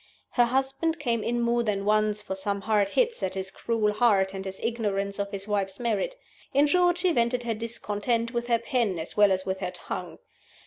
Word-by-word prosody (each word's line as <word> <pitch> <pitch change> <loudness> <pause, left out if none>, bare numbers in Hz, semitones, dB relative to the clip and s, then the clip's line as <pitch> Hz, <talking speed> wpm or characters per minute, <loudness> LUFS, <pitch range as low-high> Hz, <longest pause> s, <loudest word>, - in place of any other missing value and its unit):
Her 245 - +4
husband 270 +6 0
came 235 -6 0
in 240 0 0
more 235 0 +2
than 205 -3 -1
once 210 0 +2
for 195 - -4
some 200 +1 -2
hard 205 -1 +2
hits 475 - +1
at 190 0 -2
his 190 0 -4
cruel 215 -2 0
heart 205 -4 +3
and 190 0 -5
his 190 0 -6
ignorance 205 -4 -1
of 200 0 -1
his 200 0 -5
wife's 195 -2 -1
merits. 235 - -1 0.4
In 285 +1 +6
short, 355 +3 +3
she 360 0 +2
vented 245 -3 +1
her 235 -1 -1
discontent 230 +1 -2
with 235 0 -2
her 235 -1 +3
pen 230 - 0
as 160 0 -6
well 205 -1 +6
as 190 0 0
with 190 0 -2
her 185 -2 -2
tongue. 180 -1 -6
215 Hz, 210 wpm, -27 LUFS, 195-240 Hz, 0.4 s, In